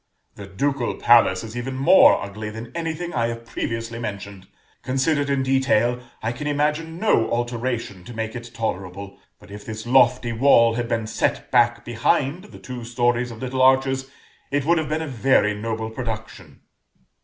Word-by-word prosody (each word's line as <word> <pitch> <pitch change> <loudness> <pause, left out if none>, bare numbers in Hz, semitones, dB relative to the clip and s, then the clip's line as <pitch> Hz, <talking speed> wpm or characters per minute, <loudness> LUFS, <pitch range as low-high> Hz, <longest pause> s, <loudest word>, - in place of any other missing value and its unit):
"The 100 - -10
Ducal 130 +5 -1
Palace 115 -6 +4
is 110 0 -8
even 125 +2 -4
more 135 +8 +6
ugly 105 +2 -6
than 115 +2 -8
anything 170 +1 -4
I 115 -2 +1
have 115 0 -6
previously 115 0 -4
mentioned. 100 -3 -7 0.3
Considered 140 +2 0
in 140 -1 +1
detail, 130 -2 +2 0.2
I 110 - 0
can 120 +5 -5
imagine 150 +3 -1
no 175 - +2
alteration 120 -5 -3
to 120 - -9
make 110 +1 -4
it 120 0 -7
tolerable; 100 -3 -5 0.2
but - - -17
if 105 0 -9
this 110 0 -7
lofty 125 -1 +3
wall 115 -1 +5
had 120 0 -2
been 115 -2 -1
set 110 - -2
back 120 -1 +3
behind 140 - 0
the - - -13
two 125 -2 -8
stories 120 +1 0
of 115 +1 -9
little 130 0 -2
arches, 135 0 +3 0.4
it 145 -1 -1
would 170 +1 +3
have 155 - -3
been 155 +1 -1
a - - -5
very 125 -4 +2
noble 110 +1 -4
production." 110 - -7
120 Hz, 170 wpm, -22 LUFS, 110-135 Hz, 0.4 s, more